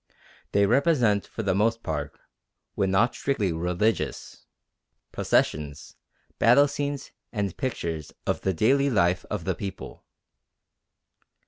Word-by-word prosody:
They 100 0 +4
represent, 120 -4 +2
for 110 - -5
the 95 -2 +1
most 115 +4 +1
part, 75 -2 -4 0.6
when 95 - 0
not 105 +6 +3
strictly 110 -9 -1
religious, 90 +7 -2 0.6
processions, 75 -2 -1 0.4
battle 130 +5 +6
scenes, 145 -1 -4 0.2
and 100 -5 -2
pictures 85 - -3
of - - -1
the 95 - +1
daily 135 +9 +3
life 90 -6 +2
of - - -3
the - - +1
people. 95 -2 -7
105 Hz, 115 wpm, -26 LUFS, 90-125 Hz, 0.6 s, battle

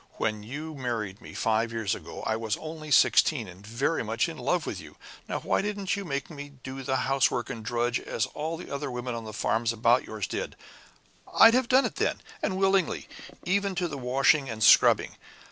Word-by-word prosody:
When 110 -1 -1
you 150 +9 -6
married 115 -7 -4
me, - - -11
five 115 +1 +1
years 110 -4 -1
ago, - - -8
I 110 - 0
was 110 -2 -2
only 155 -1 -8
sixteen, 140 -4 +4
and 90 +2 -13
very 120 +9 -1
much 115 +1 0
in - - -6
love - - 0
with - - -5
you. - - -14 0.3
Now, - - -1
why - - +1
didn't 200 -2 -2
you 200 - -4
make 140 -5 -3
me 145 -1 -9
do 130 +1 -6
the 130 0 -1
housework 130 -3 +1
and 115 - -7
drudge 120 +1 0
as 110 - -2
all 160 +2 -3
the 180 - -10
other 140 0 -3
women 125 0 -4
on 115 -1 -5
the 110 - -6
farms 110 +2 0
about 115 +2 +3
yours 110 -3 -4
did? - - -4 0.8
I'd 225 0 +8
have 255 -1 +2
done 265 +1 +5
it - - -4
then, - - 0 0.2
and 185 - -1
willingly, 195 -2 +1 0.4
even 200 +1 +1
to 180 -1 0
the 155 - -6
washing 135 +2 +2
and 110 -1 -3
scrubbing. - - +5
130 Hz, 205 wpm, -27 LUFS, 115-160 Hz, 0.8 s, I'd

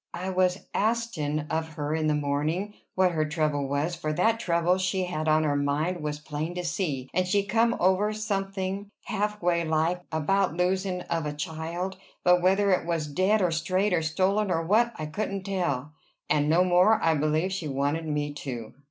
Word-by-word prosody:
I 185 +2 -3
was 185 0 +1
astin' 200 -10 0
of 160 0 -2
her 150 0 -3
in 155 -1 0
the 150 - +2
mornin' 150 +8 -1 0.2
what 185 -1 +3
her 155 -2 +1
trouble 150 -3 0
was, 145 +5 -1
for 155 -2 -3
that 225 +7 +2
trouble 175 -1 +1
she 185 0 0
had 160 -3 -3
on 155 0 +4
her 145 -2 +1
mind 150 +5 0
was 150 -1 -3
plain 150 +3 -5
to 180 - -3
see, 160 -6 -2
and 185 0 +1
she 200 +2 +2
come 230 +3 +2
over 190 +4 +3
something, 195 -2 -3
half 210 -1 -2
way 170 -1 +2
like, 160 +2 0
about 165 +2 +1
losin' 185 0 0
of 165 -3 -2
a 150 - -3
child; 165 +5 -4 0.3
but 180 0 +5
whether 195 +2 +3
it 185 - +2
were 170 -1 +1 0.2
dead, 195 +5 +3
or 175 - +2
strayed, 185 +5 +1
or 170 - +2
stolen, 190 +6 +1
or 165 -2 +1
what, 230 +6 +3
I 155 - -5
couldn't 195 +4 -3
tell; 170 -8 -2 0.4
and 150 0 +2
no 170 +3 +5
more, 185 +5 +4
I 165 - +4
believe, 155 +4 +1
she 180 -5 -3
wanted 145 +4 -1
me 145 -1 -1
to." 120 -6 -6
175 Hz, 190 wpm, -27 LUFS, 155-190 Hz, 0.4 s, but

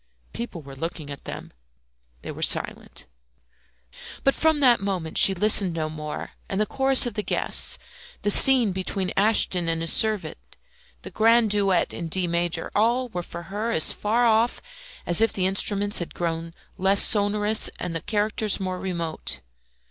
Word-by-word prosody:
People 225 -9 -7
were 135 -1 -12
looking 155 0 -7
at 140 - -11
them. - - -9 0.7
They - - -7
were - - -10
silent. - - +1 1.2
But 275 - +2
from 315 -2 0
that 250 -5 +4
moment 185 -5 -4
she 195 - +6
listened 195 -2 +3
no 155 -1 -4
more; 150 -1 -7 0.2
and 195 - -3
the 215 - +1
chorus 265 +3 +4
of 240 - -4
the 210 - -3
guests, - - -1 0.5
the 205 - +2
scene 250 -2 +6
between 185 0 -3
Ashton 195 -4 +2
and 165 0 -1
his 165 0 +1
servant, 215 -3 -1 0.6
the - - -9
grand 225 0 +2
duet 195 -3 +1
in 170 - -6
D 180 +3 -2
major, 170 -1 -2
all 240 +4 0
were 180 -5 -5
for 170 0 -10
her 205 +5 -5
as 160 -9 +6
far 230 +4 -1
off 230 +1 +1 0.5
as 175 +4 +3
if 225 - +3
the 185 - -2
instruments 200 +2 0
had 175 - -7
grown 165 -1 -5 0.2
less 195 +2 +4
sonorous 210 +1 +2
and 165 - -5
the 165 - -4
characters 210 0 -2
more 185 -1 -5
remote. 170 -4 -5
195 Hz, 165 wpm, -23 LUFS, 170-220 Hz, 1.2 s, she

